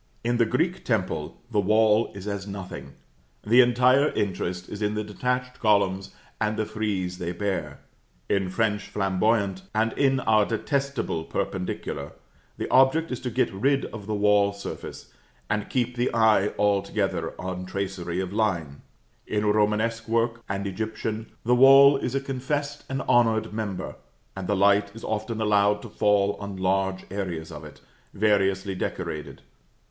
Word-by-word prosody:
In 120 +1 +1
the 115 -1 +3
Greek 170 +10 0
temple 90 -9 -2
the 105 - +2
wall 110 +2 +3
is 100 +1 -8
as 100 -1 -4
nothing; 95 -8 -7 0.5
the 120 +4 +7
entire 125 +4 +4
interest 90 -2 -2
is 105 - -7
in 105 0 0
the 105 - -1
detached 125 +4 -3
columns 95 -3 +2 0.3
and 105 0 0
the 110 - 0
frieze 95 -5 -3
they 85 0 -3
bear; 85 -6 -3 0.5
in 95 -2 0
French 105 0 -1
Flamboyant, 95 0 0
and 110 +1 +1
in 135 -1 +2
our 110 -1 +4
detestable 135 - -2
Perpendicular, 75 -6 -4 0.4
the - - -3
object 135 +5 +4
is 125 - -3
to 125 - -4
get 110 - 0
rid 135 +8 +1
of 105 -3 -8
the 110 - -1
wall 100 0 +3
surface, 100 - -8 0.4
and 105 0 -1
keep 125 -1 -1
the 120 +1 0
eye 110 -3 +4
altogether 100 -1 0
on 90 0 -5
tracery 95 -2 -3
of 95 0 -3
line; 85 -10 -1 0.5
in 105 0 -1
Romanesque 110 +2 +1
work 115 +1 0
and 100 0 -2
Egyptian, 110 +2 -4 0.2
the 120 - +3
wall 135 +2 +8
is 130 -1 -3
a - - +2
confessed 140 +2 -3
and 135 0 -2
honored 115 -3 +2
member, 100 -4 -4 0.4
and 95 -2 -5
the 105 - +1
light 100 +1 +3
is 115 - -10
often 110 +1 -3
allowed 105 -1 +3
to 120 - -8
fall 100 -1 +2
on 100 -1 -6
large 95 0 0
areas 90 -5 -4
of - - -9
it, - - -12 0.3
variously 95 -2 +1
decorated. 75 -4 -5
105 Hz, 155 wpm, -25 LUFS, 95-115 Hz, 0.5 s, wall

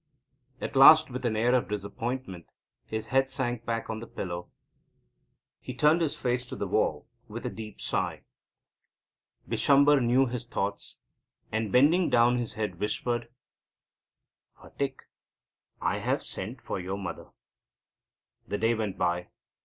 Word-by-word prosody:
At - - -5
last, 155 +2 +8
with 130 0 -2
an 110 - -1
air 120 +3 +2
of 130 0 +1
disappointment, 105 -1 -4 0.4
his 110 0 -4
head 135 0 +3
sank 120 -3 -2
back 115 -1 -2
on 110 0 -4
the 115 - -8
pillow. 90 -1 -5 1.1
He 130 - -8
turned 150 +6 +4
his 160 -3 0
face 125 0 0
to - - -6
the - - -3
wall - - 0 0.2
with - - -7
a - - -2
deep 110 -2 -9
sigh. - - -2 1.2
Bishamber 140 0 +4
knew 125 +3 +4
his 125 -1 -4
thoughts, 100 -3 -3 0.5
and, 110 -2 -1
bending 155 - +4
down 120 +1 +4
his 120 - -4
head, 105 -5 -3
whispered: 120 +2 -2 1.3
"Phatik, 135 -1 -4 0.8
I - - 0
have - - -1
sent 115 +6 -6
for - - -3
your 95 +2 -4
mother." 95 -4 -6 1.2
The 105 - -2
day 115 +2 +2
went 110 -4 -3
by. 90 0 0
120 Hz, 140 wpm, -28 LUFS, 105-130 Hz, 1.3 s, last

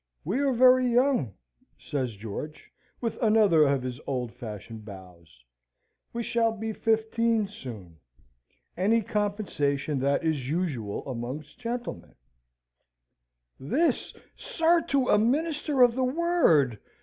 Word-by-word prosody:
"We 200 - -1
are 280 -1 +2
very 255 0 +5
young," 245 - +2 0.4
says 130 -6 -3
George, 115 +9 -8 0.3
with 230 -2 -3
another 210 - +5
of 140 -2 +1
his 125 -1 -5
old 125 -4 -3
fashioned 110 -2 -8
bows. 90 - -13 0.7
"We 235 0 -3
shall 230 0 +1
be 220 0 -4
fifteen 225 0 +1
soon. 110 - -10 0.8
Any 220 +5 +2
compensation 170 -10 -1
that 140 +3 +1
is 150 -6 -1
usual 140 - -3
amongst 130 - -6
gentlemen" 240 0 -5 1.4
"This, 285 - 0 0.2
sir, 330 +1 +2
to 275 -2 +1
a 210 - +5
minister 290 +3 +2
of 240 -1 +5
the 260 +2 -1
Word!" 255 - +2
195 Hz, 115 wpm, -27 LUFS, -, 1.4 s, very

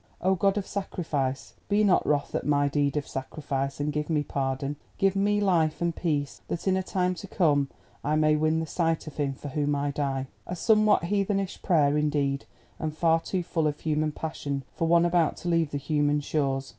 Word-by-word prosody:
Oh, 190 +2 +2
God 195 +2 +2
of 200 - -1
Sacrifice, 135 - -3 0.2
be 210 +1 +3
not 195 -3 +4
wroth 145 -1 0
at - - -1
my 145 -1 +2
deed 140 0 0
of 145 - -2
sacrifice 135 0 -3
and 145 +1 -1
give 150 +1 -2
me 150 -2 +1
pardon, 135 +1 -2 0.2
give 195 0 +2
me 205 +1 +2
life 170 -6 +2
and 170 -1 0
peace, 145 -5 -2
that 170 - -4
in 190 - +4
a 190 - +1
time 180 -1 0
to 190 +2 -8
come 145 -7 +2 0.3
I 150 +2 +1
may 155 0 +4
win 155 +1 +2
the - - -2
sight 165 0 0
of 155 - -9
him 140 -2 0
for 145 +2 -8
whom 145 0 0
I 145 0 -1
die." 135 -2 -1 0.2
A 180 - -3
somewhat 215 +1 +4
heathenish 195 +1 -1
prayer 150 -5 +3
indeed, 145 -2 0 0.3
and 155 -1 -3
far 165 -1 +4
too 180 +2 -2
full 160 -2 0
of 150 0 -2
human 155 -1 0
passion 145 -3 -4
for 165 - -1
one 170 +1 +5
about 170 -2 +2
to 175 - -4
leave 165 -3 +2
the 145 - -3
human 145 +1 +1
shores. 135 -2 -1
155 Hz, 205 wpm, -27 LUFS, 145-175 Hz, 0.3 s, one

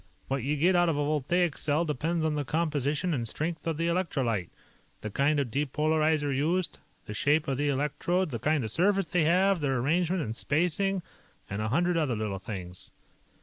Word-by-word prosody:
What 135 0 0
you 140 +5 0
get 180 +5 +3
out 175 -1 +4
of 155 - 0
a 145 - +1
voltaic 155 +3 +1
cell 155 +3 +1
depends 160 +3 -1
on 155 - +1
the 150 -1 -1
composition 150 +2 0
and 120 -5 -2
strength 165 +7 -3
of 160 -2 -1
the 165 - 0
electrolyte, 135 - 0 0.5
the 110 - -5
kind 145 +6 +2
of 130 -5 -2
depolarizer 150 +1 +1
used, 170 +6 0 0.3
the 105 - -6
shape 145 +9 +2
of 135 -1 -1
the 145 0 +1
electrodes, 150 +5 0
the 115 - -3
kind 150 +2 +1
of 110 - -4
surface 195 - +2
they 170 -2 +2
have, 185 +2 +3
their 135 -2 +1
arrangement 170 +7 +1
and 110 0 -4
spacing, 180 +7 0 0.4
and 100 +2 -4
a 110 - -1
hundred 175 +6 +2
other 145 -7 +1
little 105 -3 -3
things." 90 -4 -7
150 Hz, 190 wpm, -28 LUFS, 135-170 Hz, 0.5 s, out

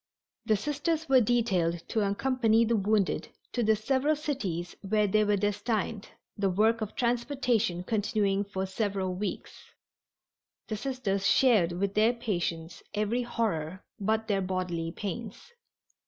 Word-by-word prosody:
The 215 -2 +4
Sisters 300 - -1
were 265 -2 +6
detailed 185 -8 +1
to 225 - 0
accompany 230 +2 +2
the 230 +1 +2
wounded 205 -1 +1 0.2
to 245 - -1
the 220 -1 +4
several 270 +7 +1
cities 225 - -3
where 210 +1 +1
they 215 +2 +3
were 205 -1 +2
destined, 205 +1 -1 0.3
the 200 -1 +1
work 220 +5 +2
of 215 -1 -4
transportation 235 -6 0
continuing 205 -1 0
for 190 -1 -3
several 190 -1 -2
weeks. 200 +3 -6 1.0
The 215 - -1
Sisters 210 -6 -1
shared 215 -10 +4
with 195 +3 -1
their 220 +3 +4
patients 175 -7 -3
every 215 +4 0
horror 190 -8 -2 0.2
but 220 +2 0
their 200 -3 +1
bodily 180 -3 -2
pains. 215 - -6
210 Hz, 135 wpm, -29 LUFS, 190-235 Hz, 1.0 s, were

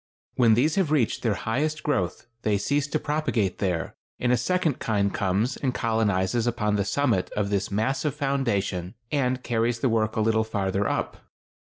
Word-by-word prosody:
When 115 -3 +4
these 150 - +2
have 190 -6 +2
reached 140 -8 +1
their 110 -4 +1
highest 150 +11 -1
growth 95 - -1 0.2
they 105 -2 +1
cease 145 +8 0
to - - 0
propagate 145 - -1
there, 90 -5 -1 0.3
and 125 - +1
a - - +5
second 155 +4 0
kind 100 -3 0
comes 100 +7 0
and 130 -3 -1
colonizes 110 -1 +1
upon 105 -3 0
the 100 -2 0
summit 115 -4 +1
of 105 -1 -1
this 100 -1 0
massive 135 +7 0
foundation 110 - -1 0.2
and 130 -3 0
carries 120 0 0
the 125 +2 +1
work 110 -1 +1
a 110 - +1
little 110 0 +2
farther 100 -2 -1
up. - - -2
115 Hz, 175 wpm, -26 LUFS, 100-135 Hz, 0.3 s, a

